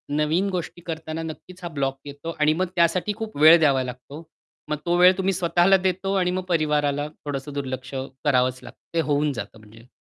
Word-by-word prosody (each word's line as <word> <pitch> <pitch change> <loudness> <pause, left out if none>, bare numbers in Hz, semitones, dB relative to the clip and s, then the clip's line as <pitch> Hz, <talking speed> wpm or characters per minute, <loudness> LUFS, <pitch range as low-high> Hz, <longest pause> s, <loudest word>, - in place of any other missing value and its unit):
नवीन 160 +6 +1
गोष्टी 175 -1 -5
करताना 160 -1 -5
नक्कीच 180 +3 -9
हा - - -3
ब्लॉक 135 -3 -2
येतो 145 +4 -7
आणि 150 +1 +4
मग 185 +3 0
त्यासाठी 175 +4 +2
खूप 220 -8 -6
वेळ 160 +3 +8
द्यावा 135 -4 +3
लागतो. 130 +5 -9 0.5
मग 150 - -1
तो 175 0 +2
वेळ 180 +1 +7
तुम्ही 190 0 +1
स्वतःला 175 +2 +3
देता 190 +1 -1
आणि 180 0 +1
मग 185 0 -2
परिवाराला 150 -3 +1
थोडंसं 145 -1 -6
दुर्लक्ष 130 -1 -5 0.3
करावंच 130 -2 +2
लागतं. - - -13
ते 165 - +2
होऊन 145 -1 +1
जातं 110 -1 -7
म्हणजे. 110 +3 -17
155 Hz, 185 wpm, -24 LUFS, 140-180 Hz, 0.5 s, वेळ